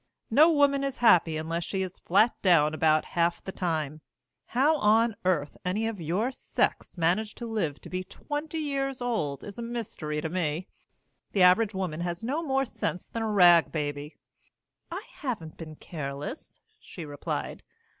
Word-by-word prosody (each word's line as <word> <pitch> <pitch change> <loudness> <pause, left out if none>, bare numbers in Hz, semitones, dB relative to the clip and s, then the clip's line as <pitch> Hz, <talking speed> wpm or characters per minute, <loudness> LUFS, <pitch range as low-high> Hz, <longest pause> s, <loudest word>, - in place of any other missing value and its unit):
No 305 +8 +7
woman 285 -2 +3
is 275 -1 -2
happy 175 -9 +5
unless 165 +2 -2
she's 190 0 -4
flat 215 +6 +3
down 160 -5 +4
about 155 0 +3
half 170 0 +1
the 190 - -5
time. 155 -5 -2 0.5
How 290 +6 +3
on 225 -1 +3
earth 160 -6 0
any 195 +5 -1
of 225 -5 -3
your 185 - 0
sex 255 - -2
manage 185 +6 +1
to 240 - -6
live 205 -11 -2
to - - -11
be 185 0 -2
twenty 295 - -5
years 275 -3 -2
old 215 - -2
is 205 +2 -8
a - - -3
mystery 225 -10 -4
to 160 - -2
me. 170 0 -2 0.7
The 195 - +4
average 200 +3 +5
woman 180 -5 -2
has 175 +3 -3
no 280 +8 -1
more 270 -4 +1
sense 180 -6 -4
than 230 - -4
a 220 - -1
rag 175 -5 +6
baby." 145 -1 -4 0.7
"I - - -6
haven't 210 - -4
been 155 -2 -8
careless," 150 - -7 0.2
she 170 - -9
replied. 145 -1 -4
185 Hz, 165 wpm, -28 LUFS, 160-235 Hz, 0.7 s, No